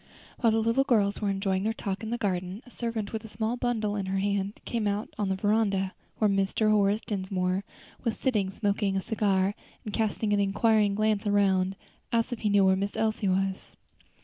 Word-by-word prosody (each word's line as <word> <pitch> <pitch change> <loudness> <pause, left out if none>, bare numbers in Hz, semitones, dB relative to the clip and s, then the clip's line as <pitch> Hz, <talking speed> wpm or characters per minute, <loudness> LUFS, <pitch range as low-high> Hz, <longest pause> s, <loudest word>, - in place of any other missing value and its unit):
While 230 -3 +4
the 225 0 +2
little 230 +4 +3
girls 215 -7 +2
were 205 - +1
enjoying 195 -1 0
their 220 +2 -1
talk 195 -2 -3
in 220 - -5
the 240 - -1
garden, 185 0 -2
a 250 - -16
servant 230 -4 -4
with 220 0 -3
a - - -8
small 220 +2 -2
bundle 225 -4 -1
in 195 -2 -2
her 190 +1 -1
hand 200 +1 -1
came 230 -3 -1
out 205 +2 -1
on 205 -2 0
the 190 - +1
veranda, 200 -1 +1 0.2
where 215 - +3
Mr. 195 +2 +2
Horace 205 0 +3
Dinsmore 190 -2 -1 0.4
was 230 -3 -1
sitting 215 -8 +1
smoking 200 0 0
a - - 0
cigar, 200 -2 +1 0.3
and, 210 - -5
casting 215 -1 0
an 205 - +3
inquiring 205 +1 +3
glance 215 0 +1
around, 195 -2 +2 0.4
asked 230 +1 +1
if 240 - -5
he 210 - 0
knew 200 -1 +5
where 190 0 +5
Miss 200 +2 -2
Elsie 215 -2 0
was? 190 +1 -1
205 Hz, 200 wpm, -28 LUFS, 195-220 Hz, 0.4 s, knew